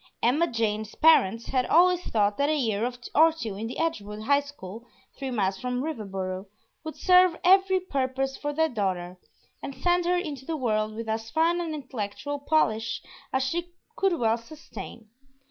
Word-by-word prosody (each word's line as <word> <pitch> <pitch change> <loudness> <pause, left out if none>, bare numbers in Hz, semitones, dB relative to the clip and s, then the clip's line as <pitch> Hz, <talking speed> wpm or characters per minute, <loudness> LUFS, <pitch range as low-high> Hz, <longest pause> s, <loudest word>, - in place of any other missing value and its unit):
Emma 290 +9 +3
Jane's 220 -2 -2
parents 230 -8 +4
had 255 -2 0
always 360 +1 +4
thought 205 -2 +1
that 285 +1 +2
a 310 - +2
year 235 -3 0 0.2
or 320 +2 +6
two 235 -10 -5
in 215 +3 -4
the 240 - -6
Edgewood 215 -10 -3
high 280 +4 +4
school 235 -7 -9 0.3
(three 270 -1 -5
miles 195 -6 -1
from 250 +2 -2
Riverboro) 195 -9 -4 0.4
would 315 -1 -6
serve 365 -2 +5
every 380 +1 +5
purpose 270 -5 -2
for 290 - -3
their 320 +2 +2
daughter 185 - -3 0.4
and 275 - -6
send 350 +5 +1
her 360 +1 +2
into 295 -7 -4
the 320 +3 -3
world 215 -4 -1
with 230 0 -6
as 220 0 -3
fine 330 +6 +2
an 325 -2 -3
intellectual 270 +1 -5
polish 230 -7 0 0.3
as 265 0 +1
she 345 +6 -3 0.2
could 390 -6 +2
well 230 -1 +1
sustain. 230 -4 -10
265 Hz, 170 wpm, -26 LUFS, 220-320 Hz, 0.4 s, or